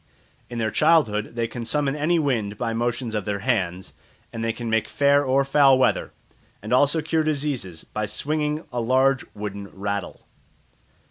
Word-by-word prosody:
In 120 Hz, -, -6 dB
their 110 Hz, -1 st, -1 dB
childhood 120 Hz, -10 st, +2 dB
they 115 Hz, -1 st, -1 dB
can 120 Hz, +1 st, -6 dB
summon 140 Hz, +4 st, 0 dB
any 155 Hz, +4 st, +1 dB
wind 115 Hz, -9 st, -1 dB
by 115 Hz, -1 st, -2 dB
motions 120 Hz, 0 st, -2 dB
of 105 Hz, -2 st, -2 dB
their 105 Hz, -1 st, -1 dB
hands, 95 Hz, -7 st, -1 dB, 0.4 s
and 115 Hz, -, -4 dB
they 115 Hz, -, +1 dB
can 120 Hz, +1 st, -6 dB
make 110 Hz, -1 st, +1 dB
fair 140 Hz, 0 st, +3 dB
or 135 Hz, 0 st, +2 dB
foul 135 Hz, -1 st, +5 dB
weather, 130 Hz, -, +1 dB, 0.5 s
and 110 Hz, +4 st, -4 dB
also 145 Hz, +4 st, +3 dB
cure 160 Hz, 0 st, +1 dB
diseases 140 Hz, -, -2 dB
by 105 Hz, 0 st, -4 dB
swinging 150 Hz, +7 st, -2 dB
a 120 Hz, -, -1 dB
large 130 Hz, +3 st, +2 dB
wooden 100 Hz, -1 st, -6 dB
rattle. 100 Hz, 0 st, -5 dB
120 Hz, 170 wpm, -24 LUFS, 105-145 Hz, 0.5 s, foul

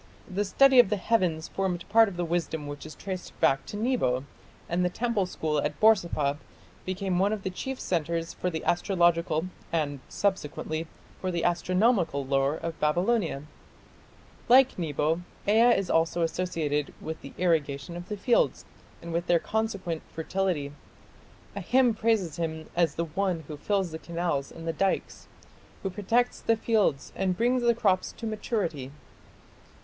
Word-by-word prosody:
The 195 Hz, +2 st, -1 dB
study 265 Hz, +6 st, +5 dB
of 240 Hz, -, +7 dB
the 210 Hz, -, +1 dB
heavens 180 Hz, -6 st, +1 dB
formed 185 Hz, -3 st, -2 dB
part 225 Hz, +1 st, +5 dB
of 180 Hz, -, -9 dB
the 175 Hz, -, -1 dB
wisdom 165 Hz, -2 st, -2 dB
which 145 Hz, +1 st, -7 dB
is 155 Hz, -, -10 dB
traced 190 Hz, -2 st, -7 dB
back 135 Hz, 0 st, +2 dB
to 205 Hz, -, -6 dB
Nebo, 215 Hz, -, +1 dB, 0.4 s
and 175 Hz, +2 st, 0 dB
the 180 Hz, -, +2 dB
temple 220 Hz, -1 st, 0 dB
school 155 Hz, -4 st, -1 dB
at -, -, -3 dB
Borsippa 170 Hz, -10 st, +3 dB, 0.5 s
became 185 Hz, -1 st, -1 dB
one 200 Hz, +2 st, +3 dB
of 215 Hz, -2 st, -3 dB
the 190 Hz, -, -2 dB
chief 265 Hz, +8 st, -5 dB
centres 165 Hz, -1 st, -1 dB
for 180 Hz, -, -2 dB
the 160 Hz, -2 st, -4 dB
astrological, 170 Hz, -3 st, +2 dB, 0.3 s
and, 145 Hz, -4 st, -1 dB
subsequently, 160 Hz, -4 st, -2 dB, 0.3 s
for 185 Hz, -, -2 dB
the 175 Hz, -2 st, -1 dB
astronomical 175 Hz, -, +2 dB
lore 135 Hz, +2 st, +1 dB
of 165 Hz, 0 st, -5 dB
Babylonia.... 175 Hz, 0 st, +1 dB, 1.1 s
Like 260 Hz, -3 st, +6 dB
Nebo, 160 Hz, +1 st, 0 dB, 0.3 s
Ea 230 Hz, +3 st, +5 dB
is 195 Hz, -, -2 dB
also 165 Hz, +1 st, +2 dB
associated 160 Hz, -4 st, -1 dB
with 160 Hz, 0 st, -6 dB
the -, -, -10 dB
irrigation 160 Hz, -3 st, 0 dB
of 175 Hz, +1 st, -8 dB
the 210 Hz, -, -3 dB
fields 235 Hz, +4 st, +2 dB, 0.4 s
and 170 Hz, 0 st, -6 dB
with 170 Hz, +1 st, -1 dB
their 175 Hz, -, +5 dB
consequent 200 Hz, -4 st, -2 dB
fertility. 165 Hz, -3 st, -1 dB, 0.8 s
A -, -, -4 dB
hymn 255 Hz, -2 st, +3 dB
praises 210 Hz, -8 st, 0 dB
him 160 Hz, -2 st, -4 dB
as 170 Hz, -4 st, +2 dB
the 170 Hz, -, -1 dB
one 175 Hz, +1 st, -1 dB
who 155 Hz, 0 st, -8 dB
fills 190 Hz, +3 st, -1 dB
the 160 Hz, -, -6 dB
canals 170 Hz, -5 st, -2 dB
and 165 Hz, 0 st, -9 dB
the 165 Hz, -, 0 dB
dikes, 195 Hz, +4 st, -1 dB, 0.6 s
who 195 Hz, -, -2 dB
protects 230 Hz, +6 st, +1 dB
the 230 Hz, -, +1 dB
fields 215 Hz, -11 st, +1 dB
and 185 Hz, -2 st, 0 dB
brings 245 Hz, +3 st, +2 dB
the 235 Hz, -1 st, +3 dB
crops 195 Hz, -5 st, +1 dB
to 230 Hz, -, -8 dB
maturity." 200 Hz, -, -2 dB
175 Hz, 160 wpm, -28 LUFS, 160-205 Hz, 1.1 s, of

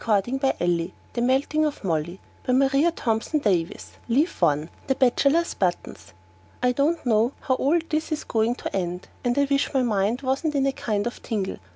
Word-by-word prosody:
org/etext/15817 200 Hz, -, +1 dB, 0.2 s
THE 240 Hz, -, -1 dB
MELTING 270 Hz, +5 st, +2 dB
OF 300 Hz, -6 st, -2 dB
MOLLY 170 Hz, 0 st, -2 dB, 0.3 s
by 255 Hz, -, +2 dB
MARIA 275 Hz, +4 st, +4 dB
THOMPSON 250 Hz, -1 st, -1 dB
DAVIESS 180 Hz, -7 st, -1 dB
Leaf 285 Hz, +9 st, +1 dB
I. 150 Hz, +1 st, +2 dB, 0.2 s
The 265 Hz, -, +2 dB
Bachelor's 280 Hz, +6 st, +2 dB
Buttons. 135 Hz, -, -3 dB, 0.5 s
I 250 Hz, -, +4 dB
don't 285 Hz, +6 st, 0 dB
know 230 Hz, +2 st, +2 dB
how 260 Hz, -, 0 dB
all 280 Hz, +6 st, +2 dB
this 315 Hz, 0 st, -2 dB
is 310 Hz, -, -2 dB
going 225 Hz, +1 st, 0 dB
to -, -, -5 dB
end, 180 Hz, -1 st, -3 dB
and 245 Hz, 0 st, 0 dB
I 285 Hz, -, +4 dB
wish 280 Hz, 0 st, +1 dB
my 260 Hz, -, +3 dB
mind 220 Hz, +3 st, 0 dB
wasn't 275 Hz, +4 st, 0 dB
in 275 Hz, -1 st, +2 dB
a 275 Hz, -, +2 dB
kind 215 Hz, -5 st, -2 dB
of 240 Hz, -, -5 dB
tingle. 205 Hz, -5 st, -3 dB
250 Hz, 180 wpm, -24 LUFS, 200-280 Hz, 0.5 s, MARIA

